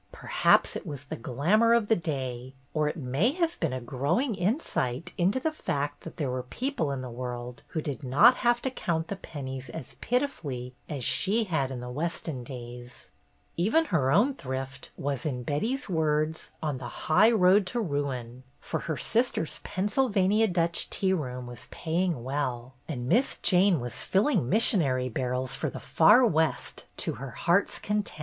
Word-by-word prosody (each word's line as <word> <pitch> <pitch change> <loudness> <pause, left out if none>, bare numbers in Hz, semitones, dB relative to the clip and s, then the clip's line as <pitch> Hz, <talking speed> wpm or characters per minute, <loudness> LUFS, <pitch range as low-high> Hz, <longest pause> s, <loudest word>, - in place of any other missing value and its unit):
Perhaps - - +2
it - - -4
was 145 -6 -7
the 140 - -6
glam 140 - +1
our 230 0 +6
of 230 -3 +1
the 225 - +4
day; 130 - -4 0.2
or 155 -1 +1
it 150 - -3
may 145 - +1
have 340 0 -1
been 165 -5 0
a 130 - -2
growing 145 - 0
insight 175 - -1
into 190 +8 +2
the 315 +4 0
fact 145 - -3
that 165 - -10
there 140 -5 -1
were 130 0 -2
people 240 - -2
in 135 -2 -3
the 130 - -5
world 120 0 -6
who 160 - -3
did 145 0 -4
not 170 - +6
have 240 0 +2
to 265 - -1
count 165 -9 -2
the 200 - -2
pen 150 -7 -8
nies 130 -1 -5
as 120 - -7
pitifully 150 - -2 0.2
as 140 -4 -4
she 210 - +2
had 160 -10 0
in 130 -2 -5
the 125 - -6
Weston 155 -2 -3
days. 120 - -10 0.5
Even 225 - +3
her 135 -5 +3
own 230 - +4
thrift 135 - -6
was, 140 -2 -2
in 125 -5 -2
Betty's 220 - -1
words, 155 -3 0
on 145 -4 -1
the 120 -2 -8
highroad 200 0 +5
to 240 - -2
ruin, 135 - -3 0.2
for - - -3
her 160 -3 -3
sister's 230 -8 0
Pennsyl 210 +8 0
vania 205 +2 +3
Dutch 170 -2 0
tea 190 -1 +1
room 125 -7 -3
was 120 -1 -10
paying 165 -5 -1
well, 130 -2 -3
and 125 -6 -4
Miss 240 - +2
Jane 185 -2 +4
was 120 -1 -4
filling 195 - +2
missionary 135 - +3
barrels 125 +2 -2
for - - -2
the - - -7
far 210 +10 +5
West 160 -7 0
to - - -1
her 135 0 -7
heart's 170 - +1
content. 210 -5 -2
155 Hz, 180 wpm, -28 LUFS, 130-200 Hz, 0.5 s, our